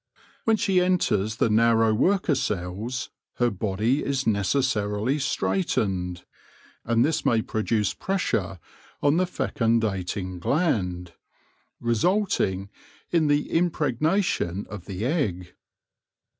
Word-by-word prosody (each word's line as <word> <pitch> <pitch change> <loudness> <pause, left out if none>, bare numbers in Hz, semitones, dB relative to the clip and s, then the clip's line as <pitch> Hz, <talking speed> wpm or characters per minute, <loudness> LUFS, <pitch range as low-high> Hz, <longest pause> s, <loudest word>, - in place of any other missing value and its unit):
When 225 -1 +3
she 190 -3 +2
enters 110 - +1
the 110 - +1
narrow 115 0 +4
worker 180 - +2
cells, 110 0 -3 0.2
her 120 -1 +1
body 110 +7 0
is 135 -1 -1
necessarily 110 +2 +1
straightened, 95 - -1 0.6
and 115 0 +2
this 155 +1 0
may 115 -2 +2
produce 110 -1 0
pressure 110 - -1 0.5
on 145 +2 +4
the 185 0 +2
fecundating 100 - -1
gland, 90 - 0 0.7
resulting 115 - 0 0.4
in 165 -3 +3
the 145 +1 +1
impregnation 155 - 0
of 100 -4 -7
the 100 +2 -4
egg. 100 - -1
115 Hz, 100 wpm, -25 LUFS, 100-150 Hz, 0.7 s, narrow